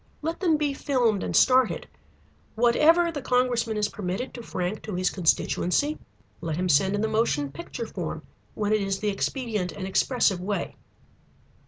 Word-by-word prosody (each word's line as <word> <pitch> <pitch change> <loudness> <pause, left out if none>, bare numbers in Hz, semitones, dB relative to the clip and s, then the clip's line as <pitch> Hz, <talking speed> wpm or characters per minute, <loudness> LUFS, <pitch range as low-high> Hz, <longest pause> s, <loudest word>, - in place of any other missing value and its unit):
Let 325 +2 -2
them 335 -5 +3
be 295 -2 0
filmed 245 -8 +1
and - - -3
started. 255 -2 +4 0.7
Whatever 310 +9 +4
the 290 -3 -5
congressman 250 -3 +1
is 210 -1 +1
permitted 200 +6 -4
to 240 - -7
frank 185 -2 -3
to 210 - -5
his 185 0 +1
constituency, 185 - +1 0.4
let 160 -2 -2
him 180 +2 -1
send 190 +6 +3
in 205 - -1
the 220 - +1
motion 150 -11 0
picture 170 - -6
form - - -5 0.3
when 210 0 0
it 215 - +2
is 195 -1 -1
the 210 +1 -1
expedient 210 -2 -2
and 190 - -6
expressive 195 -1 +1
way. 200 +2 -3
215 Hz, 165 wpm, -26 LUFS, 190-255 Hz, 0.7 s, started